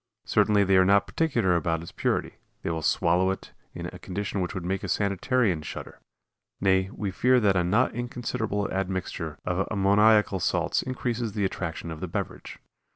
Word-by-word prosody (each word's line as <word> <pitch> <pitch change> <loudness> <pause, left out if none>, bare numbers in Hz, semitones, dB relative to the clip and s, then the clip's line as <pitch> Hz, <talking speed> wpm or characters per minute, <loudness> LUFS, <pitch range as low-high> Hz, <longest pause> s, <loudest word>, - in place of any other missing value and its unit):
Certainly 105 -1 +3
they 95 -1 +4
are 95 - +6
not 100 +2 +4
particular 120 - +1
about 85 -1 0
its 85 - -9
purity; - - -1 0.3
they - - -1
will 80 -1 -2
swallow 90 +4 +2
it 95 - -4 0.2
in - - -5
a - - -10
condition 100 +1 -3
which 90 +3 -3
would 90 -2 -4
make 95 +1 -2
a - - -3
sanitarian 100 - +1
shudder; - - -8 0.6
nay, 95 0 +2
we 100 -3 -4
fear 125 +6 +3
that 100 -4 +3
a 90 - +3
not 105 +9 +2
inconsiderable 115 -3 -2
admixture 95 -4 -3
of 90 +1 0
ammoniacal 105 0 +4
salts - - +1
increases 120 -3 -3
the 105 -2 0
attraction 85 -3 -4
of 80 - -7
the - - -4
beverage. - - -5
95 Hz, 175 wpm, -26 LUFS, 90-110 Hz, 0.6 s, are